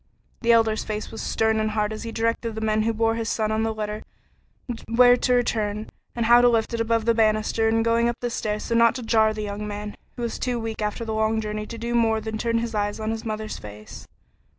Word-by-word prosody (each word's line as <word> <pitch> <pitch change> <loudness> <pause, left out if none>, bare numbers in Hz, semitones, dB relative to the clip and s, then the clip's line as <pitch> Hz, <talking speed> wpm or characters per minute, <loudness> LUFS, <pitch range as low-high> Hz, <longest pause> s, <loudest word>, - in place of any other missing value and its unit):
The 235 -1 +3
Elder's 225 -1 +3
face 215 0 -5
was 225 - -6
stern 220 0 +1
and 215 0 0
hard 210 0 -1
as 215 - -6
he 230 - -5
directed 230 0 -1
the - - -3
men 215 0 +1
who 225 +1 +1
bore 225 0 +1
his 225 -1 -2
boy 220 - 0
on 220 - 0
the 225 0 0
litter 215 -1 -4 0.9
where 245 +2 +6
to 245 0 +2
turn, 215 -2 -2 0.2
and 235 -1 0
how 240 +1 +7
to 245 - +6
lift 230 0 +1
it 230 - 0
above 230 -1 +1
the 230 - +4
banister 220 0 +2
in 225 0 +2
going 230 +1 +2
up 240 - -3
the 240 -1 -3
stair 210 -2 -2
so 230 - -3
as 230 - +4
not 230 -1 +5
to 255 - -5
jar 220 -1 +3
the 215 0 -4
young 205 0 -4
man, 210 0 -6 0.2
who 240 - -5
was 235 - -3
too 245 -2 -1
weak 225 -1 -5
after 210 +2 -2
the 220 - -3
long 220 0 +1
journey 215 0 -4
to 230 - -7
do 235 +1 -3
more 225 -2 +3
than 220 0 -5
turn 230 0 0
his 230 0 -2
eyes 205 0 -1
on 220 0 -2
his 225 0 -4
mother's 215 -1 -4
face. 105 0 -11
220 Hz, 255 wpm, -24 LUFS, 215-230 Hz, 0.9 s, how